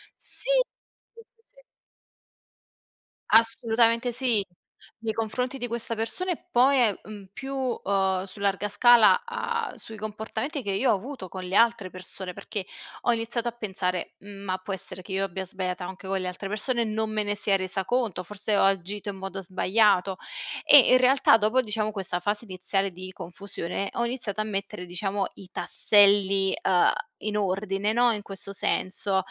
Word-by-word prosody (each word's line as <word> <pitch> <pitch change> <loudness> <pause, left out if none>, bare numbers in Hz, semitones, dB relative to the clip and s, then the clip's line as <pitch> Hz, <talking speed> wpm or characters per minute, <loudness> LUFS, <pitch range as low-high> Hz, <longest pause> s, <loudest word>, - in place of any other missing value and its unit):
Sì, - - -2 0.6
sì 460 - -13
,si, 455 - -35
sì. - - -35 1.7
Assolutamente 230 +1 +4
sì. 230 -5 +1 0.5
Nei 225 -1 -2
confronti 250 +4 -2
di 245 -1 -4
questa 230 0 -2
persona 360 +12 -2
e 350 - -5
poi, 265 +2 +5
ehm, 220 -5 +3
uhm, 205 -2 -10
più, 270 +8 -6
uhm, 195 -7 0
su 195 +2 -12
larga 200 +1 0
scala, 235 +2 +6 0.5
uhm, - - -14
sui 220 -1 -10
comportamenti 220 +7 -4
che 200 -3 -3
io 225 +6 +2
ho - - +4
avuto 240 -2 -7
con 185 +1 -7
le 185 +2 -3
altre 230 -4 +3
persone, 185 0 -8
perché 205 -1 -5 0.4
ho 240 - +2
iniziato 230 +1 -2
a - - 0
pensare: 190 -5 -3
"Ma, 195 -2 -5
può 195 +1 -5
essere 190 0 -4
che 190 - -12
io 195 +1 0
abbia 190 0 -4
sbagliato 185 -1 -4
anche 190 +1 -8
con 195 0 0
le 185 - -3
altre 190 +2 -5
persone, 235 +3 -1
non 220 0 -2
me 215 -1 0
ne 205 0 -1
sia 200 -1 +2
resa 190 0 -1
conto. 230 -8 -1
Forse 210 +2 -2
ho - - +4
agito 195 +2 0
in 195 - -5
modo 195 0 -6
sbagliato." 190 +1 +2 0.5
E 290 - +9
in 255 - +8
realtà, 255 -3 +5
dopo 220 +5 +2
diciamo 215 -1 -2
questa 190 -3 -2
fase 210 +4 -2
iniziale 195 0 -2
di 185 +1 -9
confusione, 190 +1 -5
ho 235 - 0
iniziato 230 -4 -3
a - - 0
mettere, 200 -2 -4
diciamo, 195 +3 -2
i 195 -2 -13
tasselli, 195 0 +4
uhm, 180 -2 +4 0.3
in 210 0 -2
ordine, 195 +1 0
no, 240 0 +4
in 210 -2 -2
questo 195 0 -6
senso, 190 +1 0
205 Hz, 170 wpm, -26 LUFS, 190-230 Hz, 1.7 s, E